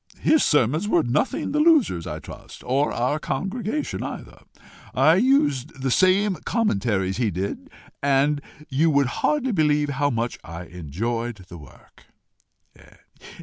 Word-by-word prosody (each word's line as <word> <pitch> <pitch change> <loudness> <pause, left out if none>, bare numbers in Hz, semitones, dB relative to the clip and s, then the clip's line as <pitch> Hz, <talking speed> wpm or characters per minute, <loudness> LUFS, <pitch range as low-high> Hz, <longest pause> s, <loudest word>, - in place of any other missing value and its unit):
His 315 - +3
sermons 150 - +2
were 175 -6 +3
nothing 135 - -1
the 300 - 0
losers, 300 - +3
I - - -4
trust, - - -12
or 135 +4 +1
our 125 +6 -1
congregation 215 - -3
either. - - -7 0.6
I 155 +6 +5
used 150 - +1
the 135 - 0
same 190 +4 +3
commentaries 100 - 0
he 120 -3 +1
did, 95 +2 -4 0.3
and 140 +1 +2 0.3
you 150 +5 +2
would 140 -2 +3 0.2
hardly 285 -4 +1
believe 150 -5 +2
how 145 +1 0
much 120 -1 -2
I 85 +1 -8
enjoyed 100 - -4
the 85 - -9
work. 70 -3 -18
140 Hz, 135 wpm, -23 LUFS, 115-185 Hz, 0.6 s, I